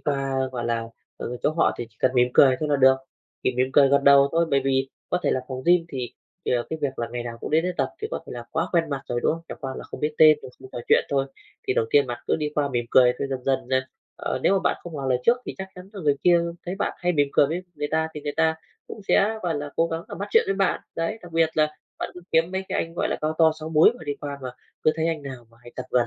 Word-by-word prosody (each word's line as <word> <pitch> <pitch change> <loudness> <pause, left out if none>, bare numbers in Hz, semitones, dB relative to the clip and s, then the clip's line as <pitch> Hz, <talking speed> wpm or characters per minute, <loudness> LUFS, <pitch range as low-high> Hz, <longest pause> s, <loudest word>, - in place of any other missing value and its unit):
qua, 135 -2 -1
gọi 120 -1 -3
là, 115 -1 0 0.3
ờ, 125 - -5
chỗ - - +3
họ 165 +2 +2
thì 120 - -4
chỉ - - -31
cần 130 - +3
mỉm 125 0 +4
cười 130 -2 +6
thôi 155 - -1
là 145 - +3
được, 130 -1 +6 0.5
chỉ 130 - 0
mỉm 130 +1 +3
cười 140 0 +6
gật 140 0 +3
đầu 140 0 +7
thôi, 165 0 +2
bởi 140 -1 +3
vì 135 0 +1 0.2
có 180 - +2
thể - - +2
là 130 - +1
phòng 130 0 -5
gym 175 -1 +5
thì 125 -4 -5 0.3
thì, - - +1
à, 120 -1 +2
cái 160 - -3
việc 135 -2 -2
là 115 - -2
ngày 120 - -3
nào 120 -1 -7
cũng - - -5
đến 160 +2 +3
đấy 180 - 0
tập - - +1
thì 435 - -2
có - - -2
thể - - -8
là - - -7
quá - - -1
quen 165 -3 +1
mặt 140 -1 -3
rồi, 120 0 -1
đúng - - +3
không? 165 +1 -6
Chẳng - - -7
qua 135 -2 -4
là - - -7
không - - -9
biết 150 0 -1
tên 155 -1 +7
rồi - - -9
không 130 - -11
trò - - -5
chuyện - - +5
thôi. 135 -1 +1 0.4
Thì 130 - +2
đầu 115 - +2
tiên 145 -2 +4
bạn 120 -1 -4
cứ - - +2
đi 150 -2 -2
qua 145 -1 +1
mỉm 120 -3 -1
cười 125 -1 +6
rồi 135 +2 -4
dần 130 -2 -4
dần 135 -1 0
này, 130 0 +2 0.4
ờ, - - -2
nếu - - +4
mà 195 - +4
bạn - - +2
không 170 -2 -9
ngỏ 140 -2 -4
lời 125 -1 +2
trước 240 - +5
thì - - -5
chắc 190 0 -5
chắn 180 +1 -11
là 200 - -7
người 145 -4 +2
kia 175 -1 +5 0.3
thấy 180 - -2
bạn 200 - -1
hay 180 0 +1
mỉm 145 -3 +2
cười - - +5
với 170 +5 -3
người 145 -1 -3
ta 160 0 +1
thì 150 - -5
người 145 - -4
ta 160 0 +3 0.3
cũng - - -9
sẽ, 220 +2 +3
gọi 175 -2 -1
là, 145 0 -4
cố 165 - +3
gắng, 165 0 -4
à, - - -6
bắt 200 +1 -5
chuyện - - +5
với 195 - 0
bạn, 195 -1 +1 0.2
đấy. 190 +7 -2
Đặc 175 -2 -12
biệt 165 -1 +3
là 155 0 +4 0.3
bạn - - -3
cứ 180 - -9
kiếm 165 +2 +3
mấy 190 0 -2
cái - - -1
anh, 165 - -13
gọi - - -1
là, - - -1
cao 155 +1 -1
to 160 -1 +6
6 155 - -5
múi 160 +6 +6
mà - - -11
đi 145 - -1
qua 140 -1 -5
mà 130 - -4 0.3
cứ 155 - +5
thấy 160 - 0
anh 165 -3 -2
nào 130 -4 -8
mà 115 - -23
hay 120 0 -14
tập 130 - -5
gần 120 -1 +3
145 Hz, 315 wpm, -24 LUFS, 130-165 Hz, 0.5 s, đầu